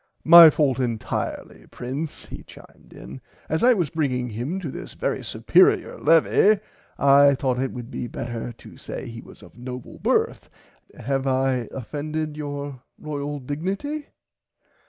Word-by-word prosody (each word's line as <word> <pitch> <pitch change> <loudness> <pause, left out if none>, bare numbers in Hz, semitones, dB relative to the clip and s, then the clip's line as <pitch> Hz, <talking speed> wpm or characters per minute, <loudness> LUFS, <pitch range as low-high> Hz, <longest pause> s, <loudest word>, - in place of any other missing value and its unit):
My 170 0 +11
fault 140 -4 +1
entirely 115 -4 -4
Prince 135 +6 -5
he - - -9
chimed - - -17
in, 65 +2 -11 0.3
as 160 +6 -1
I 250 0 +6
was 175 -8 -1
bringing 125 -6 -1
him 125 - -3
to 155 -7 -5
this - - -9
very - - -2
supearier - - +2
levie 195 +5 +4 0.4
I 140 0 +6
thought 130 -2 -1
it 130 0 -1
would 120 0 -8
be 120 - -4
better 120 0 -5
to 115 - -15
say - - -7
he 115 0 -8
was - - -16
of - - -16
noble 125 0 -8
birth - - 0 0.5
have 135 +2 -2
I 130 -2 0
offended 150 +4 -4
your 145 -3 -6 0.2
Royal 145 -1 -5
dignity. 190 - -4
140 Hz, 145 wpm, -23 LUFS, 125-155 Hz, 0.5 s, My